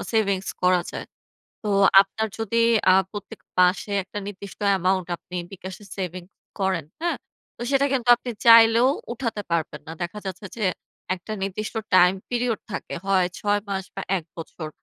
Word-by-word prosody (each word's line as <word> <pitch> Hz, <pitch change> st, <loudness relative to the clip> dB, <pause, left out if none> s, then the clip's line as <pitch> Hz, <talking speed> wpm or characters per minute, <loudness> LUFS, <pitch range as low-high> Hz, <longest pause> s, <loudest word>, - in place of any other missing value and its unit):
Savings 200 Hz, -4 st, +1 dB
করা 180 Hz, -1 st, +4 dB
যায়। -, -, -6 dB, 0.6 s
তো 210 Hz, -, -3 dB, 0.3 s
আপনার 210 Hz, +3 st, -1 dB
যদি 230 Hz, +1 st, +1 dB, 0.3 s
আ -, -, +6 dB, 0.2 s
প্রত্যেক 205 Hz, +1 st, -8 dB, 0.2 s
মাসে 180 Hz, +3 st, +3 dB
একটা 205 Hz, -, -7 dB
নির্দিষ্ট 200 Hz, -1 st, -8 dB
অ্যামাউন্ট 185 Hz, -1 st, +1 dB
আপনি 180 Hz, -, -9 dB, 0.2 s
বিকাশে 190 Hz, +1 st, -8 dB
সেভিং 185 Hz, -1 st, -4 dB, 0.4 s
করেন। 190 Hz, -5 st, 0 dB, 0.2 s
হ্যাঁ? 345 Hz, -, 0 dB, 0.4 s
তো -, -, -7 dB
সেটা 280 Hz, 0 st, +3 dB
কিন্তু 245 Hz, -2 st, -1 dB
আপনি 245 Hz, 0 st, -6 dB, 0.2 s
চাইলেও 230 Hz, +2 st, +8 dB, 0.2 s
উঠাতে 230 Hz, -4 st, -3 dB
পারবেন 160 Hz, -3 st, -1 dB
না। 160 Hz, -, -7 dB
দেখা 175 Hz, +5 st, -4 dB
যাচ্ছে 190 Hz, +2 st, -5 dB
যে, 215 Hz, -, -2 dB, 0.5 s
একটা 190 Hz, +4 st, -8 dB
নির্দিষ্ট 200 Hz, +3 st, -3 dB, 0.2 s
টাইম 180 Hz, +1 st, +7 dB, 0.2 s
পিরিয়ড 240 Hz, -2 st, 0 dB
থাকে, -, -, -5 dB
হয় 190 Hz, -2 st, +3 dB
৬ 205 Hz, 0 st, +1 dB
মাস 190 Hz, -1 st, -2 dB
বা -, -, -4 dB, 0.2 s
১ 160 Hz, -, -11 dB
বছর। 160 Hz, -1 st, -7 dB
195 Hz, 160 wpm, -24 LUFS, 185-225 Hz, 0.6 s, চাইলেও